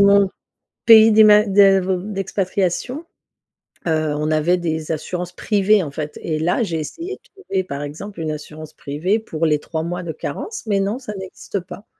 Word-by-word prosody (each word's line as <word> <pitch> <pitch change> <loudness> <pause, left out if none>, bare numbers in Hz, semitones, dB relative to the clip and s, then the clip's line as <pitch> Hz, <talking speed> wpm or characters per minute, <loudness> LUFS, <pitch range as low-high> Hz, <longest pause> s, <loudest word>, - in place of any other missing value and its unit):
mon 200 -1 +5 0.6
pays 225 -1 +8
d'ima 210 -1 +7
d'a 195 -1 +5
ve 185 -1 -1
d'expatriation. 195 - -2 0.8
Heu, 155 -2 0
on 150 +1 -1
avait 155 +4 +2
des 160 -2 -3
assurances 180 +3 -4
privées, 205 +2 +2
en 150 - -5
fait 150 +1 -6
et 155 -2 -2
là, 175 +9 +1
j'ai 170 -7 -2
essayé 340 - -6
de - - -28 0.2
trouver, 190 - -1
par 140 -5 -5
exemple, 160 +8 -8
une 155 - -2
assurance 155 +1 -8
privée 160 +11 -1
pour 165 -7 -3
les 150 -1 +2
3 160 0 -4
mois 175 +2 -4
de 170 -2 -4
carence, 360 - -6
mais 200 -2 +1
non, 200 +5 -1
ça 245 -5 -7
n'existe 190 +1 -6
pas 195 +4 -11
180 Hz, 180 wpm, -20 LUFS, 155-205 Hz, 0.8 s, pays